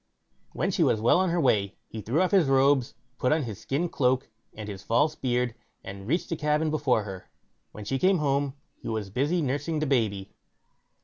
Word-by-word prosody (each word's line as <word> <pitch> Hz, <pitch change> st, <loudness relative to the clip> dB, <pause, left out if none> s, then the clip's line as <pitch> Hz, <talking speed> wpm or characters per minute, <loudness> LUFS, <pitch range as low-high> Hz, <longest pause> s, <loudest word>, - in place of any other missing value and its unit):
When -, -, -1 dB
she -, -, -1 dB
was 110 Hz, -, +3 dB
well 115 Hz, +10 st, +4 dB
on 185 Hz, -1 st, +2 dB
her 170 Hz, +1 st, 0 dB
way, 105 Hz, -, +2 dB
he 110 Hz, -, -7 dB
threw 135 Hz, -, +1 dB
off 185 Hz, -, 0 dB
his 190 Hz, -7 st, +4 dB
robes, 135 Hz, -1 st, +3 dB, 0.2 s
put 125 Hz, -, +1 dB
on 155 Hz, 0 st, +2 dB
his 110 Hz, -6 st, -7 dB
skin 150 Hz, +6 st, -1 dB
cloak, 130 Hz, -5 st, 0 dB, 0.2 s
and 105 Hz, -1 st, -8 dB
his 100 Hz, -2 st, -7 dB
false 145 Hz, +9 st, +2 dB
beard, 125 Hz, -4 st, -1 dB, 0.3 s
and 100 Hz, 0 st, -9 dB
reached 170 Hz, +6 st, 0 dB
the 165 Hz, -, -1 dB
cabin 150 Hz, 0 st, 0 dB
before 140 Hz, -7 st, +1 dB
her. 95 Hz, -3 st, -9 dB, 0.4 s
When 105 Hz, -, -9 dB
she 135 Hz, +5 st, -1 dB
came 190 Hz, +4 st, +4 dB
home, 140 Hz, -2 st, 0 dB, 0.3 s
he -, -, -8 dB
was 110 Hz, -3 st, -3 dB
busy 150 Hz, -, 0 dB
nursing 145 Hz, +4 st, -1 dB
the 155 Hz, -, 0 dB
baby. 110 Hz, -8 st, -1 dB
135 Hz, 200 wpm, -27 LUFS, 110-155 Hz, 0.4 s, well